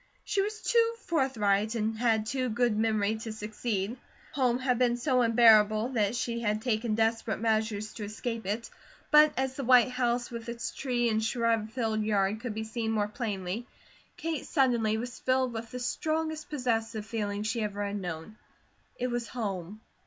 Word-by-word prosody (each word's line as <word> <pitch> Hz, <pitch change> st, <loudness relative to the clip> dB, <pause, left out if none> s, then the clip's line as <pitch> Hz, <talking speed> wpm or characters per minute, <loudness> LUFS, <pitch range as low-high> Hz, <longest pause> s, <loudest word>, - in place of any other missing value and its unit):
She 395 Hz, -, +1 dB
was 425 Hz, +2 st, -4 dB
too 460 Hz, 0 st, +3 dB
forthright 220 Hz, -8 st, +1 dB
and 220 Hz, 0 st, -1 dB
had 220 Hz, -2 st, +1 dB
too 255 Hz, +2 st, -1 dB
good 235 Hz, 0 st, +1 dB
memory 215 Hz, -1 st, +1 dB
to 225 Hz, 0 st, -6 dB
succeed. 215 Hz, 0 st, -3 dB, 0.3 s
Home 250 Hz, -3 st, +2 dB
had 255 Hz, -1 st, 0 dB
been 240 Hz, -1 st, +3 dB
so 255 Hz, 0 st, +2 dB
unbearable 225 Hz, -1 st, +5 dB
that 220 Hz, -3 st, 0 dB
she 235 Hz, -1 st, -2 dB
had 215 Hz, -1 st, -1 dB
taken 225 Hz, -2 st, 0 dB
desperate 225 Hz, 0 st, 0 dB
measures 215 Hz, -1 st, 0 dB
to 210 Hz, -, -5 dB
escape 225 Hz, +1 st, -4 dB
it, 220 Hz, +3 st, -3 dB, 0.4 s
but 300 Hz, 0 st, +8 dB
as 265 Hz, 0 st, 0 dB
the 275 Hz, -, -4 dB
white 250 Hz, -1 st, +6 dB
house 245 Hz, -1 st, 0 dB
with 235 Hz, 0 st, -6 dB
its 235 Hz, 0 st, -4 dB
tree 245 Hz, -3 st, 0 dB
and 220 Hz, -1 st, +1 dB
shrub 225 Hz, -1 st, +1 dB
filled 220 Hz, -2 st, -1 dB
yard 210 Hz, -1 st, +1 dB
could 235 Hz, -4 st, -4 dB
be 220 Hz, -, -3 dB
seen 220 Hz, 0 st, -3 dB
more 210 Hz, -2 st, +1 dB
plainly, 210 Hz, 0 st, -4 dB, 0.5 s
Kate 320 Hz, -4 st, -3 dB
suddenly 235 Hz, -7 st, +2 dB
was 240 Hz, +1 st, -5 dB
filled 255 Hz, -1 st, +1 dB
with 225 Hz, 0 st, -5 dB
the 250 Hz, -, -6 dB
strongest 315 Hz, +4 st, -2 dB
possessive 225 Hz, -6 st, -1 dB
feeling 205 Hz, -2 st, -3 dB
she 225 Hz, +2 st, -1 dB
ever 205 Hz, -1 st, -2 dB
had 200 Hz, 0 st, -3 dB
known. 175 Hz, +4 st, -6 dB, 0.6 s
It 250 Hz, 0 st, -2 dB
was 240 Hz, -1 st, -2 dB
home. 205 Hz, -3 st, -4 dB
230 Hz, 175 wpm, -29 LUFS, 215-250 Hz, 0.6 s, but